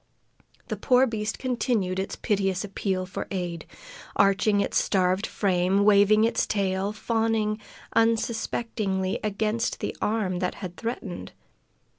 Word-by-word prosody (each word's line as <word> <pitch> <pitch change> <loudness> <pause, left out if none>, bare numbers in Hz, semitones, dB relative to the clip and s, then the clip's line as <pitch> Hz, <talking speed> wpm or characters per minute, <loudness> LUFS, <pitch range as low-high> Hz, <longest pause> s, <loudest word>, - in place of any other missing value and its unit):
The - - -2
poor 255 0 +4
beast 220 -3 -3
continued 230 -7 0
its 190 - -3
piteous 195 -3 0
appeal 190 -2 -2
for 185 - -5
aid, 175 -4 -4 0.5
arching 200 +1 +3
its - - +1
starved 185 +1 +1
frame, 190 0 +1
waving 210 +1 +6
its 230 - +1
tail, 195 -1 0
fawning 220 -1 0 0.3
unsuspectingly 225 -4 0
against 215 +2 -1
the - - -3
arm 205 -5 0
that 180 0 -1
had 180 -3 -7
threatened. 225 -5 -5
205 Hz, 120 wpm, -26 LUFS, 190-225 Hz, 0.5 s, waving